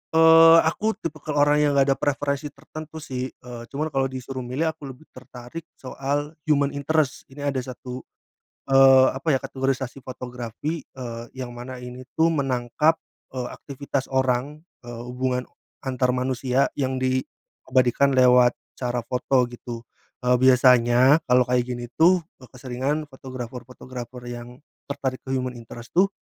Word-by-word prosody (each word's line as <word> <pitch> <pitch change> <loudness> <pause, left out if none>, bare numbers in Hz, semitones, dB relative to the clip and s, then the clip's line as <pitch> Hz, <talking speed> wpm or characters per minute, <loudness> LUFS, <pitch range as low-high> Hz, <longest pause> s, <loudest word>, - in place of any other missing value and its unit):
Eee, 165 0 +8
aku 215 +7 0
tipikal 155 -6 -5
orang 145 0 +3
yang 150 -1 +3
nggak 140 - +5
ada 135 - +1
preferensi 145 +1 -1
tertentu 155 +2 -11
sih. 130 -2 -4
Eee, 120 -2 -10
cuman 155 +2 -3
kalau 135 0 +1
disuruh 130 0 -6
milih 130 +6 -1
aku 155 -3 -11
lebih 130 +3 -11
tertarik 130 +5 -10
soal 140 +3 -3 0.2
human 140 -2 +3
interest. 145 0 -1
Ini 140 +2 -10
ada 135 - -2
1, 125 0 -7 0.7
eee, 135 -1 +7
apa 135 +5 -8
ya? - - 0
Kategorisasi 135 0 -2
fotografi, 125 +4 -6
eee, 120 -3 -7
yang 125 -2 -6
mana 125 +1 -8
ini 125 +1 -9
tuh, 165 +1 +3
menangkap, 135 +2 +1 0.4
eee, 125 -1 -3
aktivitas 140 -1 -4
orang, 130 +3 -1 0.2
eee, 120 0 -7
hubungan 125 0 -2 0.4
antar 125 -1 0
manusia 130 +1 0
yang 130 -1 0
di 130 0 +1 0.5
abadikan 130 +1 +3
lewat 125 -1 +5 0.2
cara 120 -2 -2
foto 125 0 +1
gitu. 120 -1 -8 0.4
Eee, 125 0 +4
biasanya, 125 +2 +5
kalau 125 0 +5
kayak 125 0 0
gini 120 0 -7
tuh, 175 +1 +5 0.2
keseringan 130 +4 -3
fotografer-fotografer 125 -1 -8
yang 120 +3 -9 0.2
tertarik 135 -2 -3
ke 135 - -1
human 125 -1 -3
interest 120 +1 -11
tuh, 185 +3 +4
130 Hz, 145 wpm, -24 LUFS, 125-140 Hz, 0.7 s, Eee